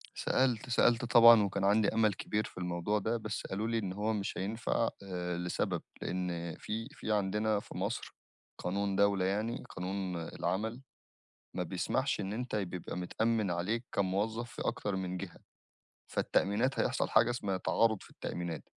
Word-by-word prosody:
سألت، 130 -2 +1
سألت 120 0 +4
طبعًا 115 -2 +8
وكان 100 0 -1
عندي 100 +1 +4
أمَل 110 -2 +3
كبير 105 +3 -1
في - - -10
الموضوع 90 +3 0
ده، 115 +4 0
بس 110 -2 -4
قالوا 105 +3 -2
لي 115 0 0
إن 100 -4 -2
هو 105 +3 0
مش 100 -2 -3
هينفَع 110 +3 0
آآ 90 -2 -3
لسبب، 90 0 -1 0.2
لإن 85 -2 -3
في 115 +3 -4
في 110 - -5
عندنا 105 +1 +1
في - - -10
مصر - - -3 0.4
قانون 100 +2 -1
دولة 100 -1 +3
يعني، 105 +4 -1
قانون 95 0 -3
العمل 100 +8 -2 0.8
ما 90 - 0
بيسمَحش 105 +10 0
إن 100 0 -3
أنت 125 +2 -3
ي 105 -2 +1
بيبقى 90 -1 -6
متأمن 110 +3 0
عليك 105 +8 -1
كموظف 105 +5 0
في 120 - -6
أكتر 100 -2 -1
من 95 -1 -3
جهة. 90 -1 -7 0.7
فالتأمينات 115 +7 +1
هيحصَل - - +1
حاجة 110 +2 +5
اسمها 105 -6 -1
تعارُض 110 +2 +2
في - - -15
التأمينات. 85 -2 -5
100 Hz, 160 wpm, -32 LUFS, 95-110 Hz, 0.8 s, طبعًا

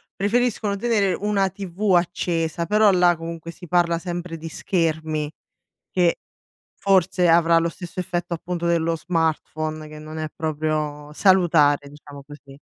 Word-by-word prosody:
preferiscono 215 0 0
tenere 205 -3 +1
una 200 -2 0
TV 195 +1 -1
accesa, 170 -1 0
però 210 +2 +5
là 180 -2 +4
comunque 165 0 -7
si 175 +1 -10
parla 170 -1 +2
sempre 175 -1 -5
di 165 - -8
schermi, 160 -4 -1 0.6
che 175 -2 +2 0.6
forse 185 -2 +3
avrà 165 0 +5
lo 165 0 0
stesso 175 +2 -8
effetto 175 -1 -3
appunto 170 +1 -4
dello 165 -1 +1
smartphone, 155 -2 -2
che 155 0 -10
non 155 +1 -9
è 155 -1 -3
proprio 150 -1 -2
salutare, 155 -6 +3
diciamo 145 -1 -12
così. 145 -1 -14
170 Hz, 135 wpm, -23 LUFS, 155-185 Hz, 0.6 s, però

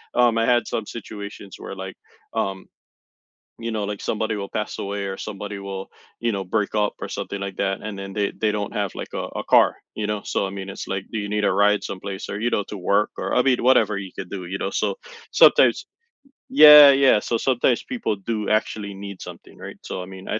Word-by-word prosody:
um, 120 -2 +4
I 115 - +2
had 120 -1 +2
some 110 - -3
situations 100 -3 -8
where, - - -7
like, 95 0 -7 0.4
um, 95 -1 -2 0.9
you 115 0 -4
know, 110 -2 -2
like, 100 0 -4
somebody 110 0 -1
will 100 -1 -5
pass 105 - -4
away 100 0 -3
or 95 - -5
somebody 100 -1 -6
will, 95 -1 -6 0.3
you 120 -1 +1
know, 100 -1 -3
break 105 +2 -1
up 105 -1 +1
or - - -5
something 100 -1 -5
like 95 -1 -5
that, 95 -1 -1
and 105 -2 -6
then 100 0 -7
they 100 -1 0
they 105 -1 0
don't 105 -1 -3
have 100 -2 -2
like - - -7
a - - -3 0.2
a - - -4
car, - - +4 0.2
you 105 -1 -2
know. 105 -1 -2
So 100 - -1
I - - -7
mean 100 0 -6
it's - - -7
like, 95 0 -3
"Do 110 - -2
you 100 0 -4
need 105 -1 0
a - - +3
ride 105 +1 +3
someplace 100 0 -6
or, 100 - -4
you 120 +2 0
know, 105 - 0
to 105 - -6
work 100 +3 +1
or," - - -2
I 125 - +5
mean, 130 -2 +2
whatever 110 -5 +4
you 95 -2 -6
could 90 - -6
do, 95 -3 -6
you 95 +3 -4
know. 95 - -2
So, - - -1 0.4
sometimes - - +5 0.7
Yeah, 150 - +11
yeah. 135 -5 +5
So 115 - -1
sometimes 125 -1 +1
people 235 - -2
do, 105 +1 -3
actually, 105 -1 -1
need 100 -1 -9
something, - - -11
right? - - -9
So - - -5
I - - -8
mean, 95 0 -11
I - - -2
105 Hz, 230 wpm, -23 LUFS, 100-110 Hz, 0.9 s, Yeah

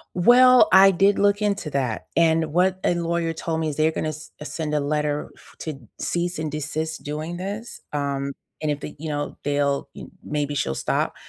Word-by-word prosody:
Well, 245 +5 +7
I 195 +1 +8
did 195 +2 +3
look 205 +1 +3
into 200 -7 -1
that, 130 -5 -2
and 160 -2 +3
what 185 +2 +2
a - - +3
lawyer 170 -1 -1
told 160 0 -3
me 160 - 0
is 145 - -5
they're 155 +1 +3
gonna 155 - -2
s 155 0 -8
send 150 0 -3
a - - +2
letter 150 0 -1
f - - -19
to 155 -4 -5 0.2
cease 175 +1 -1
and 155 -1 -3
desist 155 +2 -3
doing 155 +4 -4
this. 205 +6 -6
Um, 140 -1 -2 0.3
and 155 - -1
if 145 -1 -1
they, 150 - -8
you 160 +1 -5
know, 145 -1 -3
they'll 145 -1 0
y - - -8 0.2
maybe 145 -1 -2
she'll 65 - -1
stop. - - -1
155 Hz, 195 wpm, -23 LUFS, 145-175 Hz, 0.3 s, I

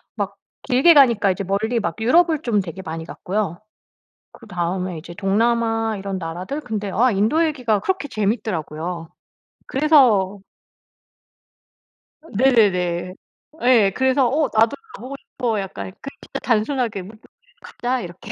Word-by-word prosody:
막 200 -2 -3 0.3
길게 270 +6 +5
가니까 235 -9 +5
이제 190 +2 -3
멀리 215 +5 0
막 170 -6 -3
유럽을 315 +6 +3
좀 225 -4 +1
되게 185 0 -7
많이 160 -1 -6
갔고요. 185 0 -3 0.7
그다음에 180 -4 -4
이제 170 +2 -9
동남아 225 +3 +1
이런 195 0 -4
나라들? 180 - -5
근데 210 -6 -4
아 240 +7 +3
인도 225 +12 +2
얘기가 250 -9 0
그렇게 375 - -2
재밌더라고요. 180 - -3 0.6
그래서 245 -10 +3 1.9
네네네. 185 -7 +2 0.5
예. 235 -6 +5
그래서 260 0 +3
'어 295 +4 +1
나도 225 +1 +3 0.2
가보고 260 +3 -8
싶어.' 235 -5 -3
약간 195 -1 -6 0.2
그냥 275 - -9
진짜 - - -7
단순하게 230 -2 0
'뭐 200 +4 -11 0.5
가자.' 250 +1 -3
이렇게. 175 -2 -9
215 Hz, 285 characters per minute, -21 LUFS, 190-250 Hz, 1.9 s, 길게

